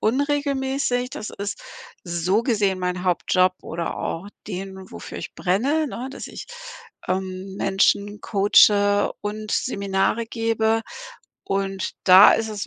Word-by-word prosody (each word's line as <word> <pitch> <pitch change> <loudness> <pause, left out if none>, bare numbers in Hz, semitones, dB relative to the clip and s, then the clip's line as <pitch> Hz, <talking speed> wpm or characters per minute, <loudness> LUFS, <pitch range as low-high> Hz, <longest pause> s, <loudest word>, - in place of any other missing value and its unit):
unregelmäßig. 270 -1 0
Das 215 - -6
ist, 200 0 -5 0.5
so 180 +4 0
gesehen, 205 -6 +1
mein 180 0 -2
Hauptjob 185 +1 +2
oder 170 0 -4
auch 175 +5 -4 0.2
den, 190 -1 -7
wofür - - -8
ich - - -8
brenne, 270 - +1
ne, 255 -1 -6
dass 275 - -8
ich, - - -8 0.6
ähm, 185 +1 -3
Menschen 200 +1 +1
coache 205 0 +4
und 215 +1 -5
Seminare 200 0 0
gebe. 225 -1 0 0.6
Und 195 -1 -2
da 185 +2 +9
ist 225 - 0
es 210 -2 -5
205 Hz, 125 wpm, -23 LUFS, 190-225 Hz, 0.6 s, da